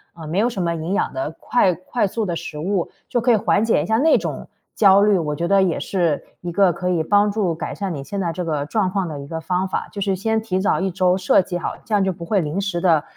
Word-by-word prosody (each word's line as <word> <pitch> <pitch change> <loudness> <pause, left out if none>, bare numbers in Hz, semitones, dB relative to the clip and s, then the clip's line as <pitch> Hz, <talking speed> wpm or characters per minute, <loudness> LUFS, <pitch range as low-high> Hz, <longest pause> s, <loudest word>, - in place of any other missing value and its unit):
呃 165 -2 -9
没 170 +5 -1
有 235 +3 +3
什 195 -6 -4
么 170 -1 0
营 165 +4 -3
养 200 - 0
的 135 +4 -3
快 190 -7 +2
快 200 +5 -2
速 220 +3 -2
的 175 -3 -2
食 150 - -6
物， 180 +2 -1 0.2
就 240 - 0
可 245 +1 +3
以 - - +6
缓 210 0 +2
解 225 - +2
一 - - -4
下 220 0 +1
那 320 +3 +5
种 - - -5 0.3
焦 200 -1 +6
虑。 205 -3 +4
我 150 -2 -2
觉 170 +2 -2
得 195 -1 +4
也 180 -4 +1
是 170 -6 0 0.2
一 175 - -4
个 180 0 +3
可 180 +3 -3
以 170 -3 +1
帮 205 +4 +3
助 200 -5 0
改 160 - -5
善 195 -4 -3
你 140 - -5
现 200 +7 -5
在 170 -3 -1
这 180 +1 -3
个 150 -3 -2
状 190 +4 0
况 190 -2 -1
的 150 -3 -6
一 140 - -8
个 160 +2 -4
方 180 +3 -1
法， 185 - -3
就 205 - -6
是 195 -1 +1
先 220 +3 0
提 190 -4 -2
早 195 - +1
1 190 - 0
周 180 0 +2
设 190 0 +3
计 175 0 -4
好， - - -4
这 220 - -5
样 205 - +3
就 190 - +1
不 170 -1 -8
会 200 +3 +1
临 160 +2 -2
时 195 -4 -2
地 165 -5 +3
185 Hz, 305 characters per minute, -21 LUFS, 170-200 Hz, 0.3 s, 以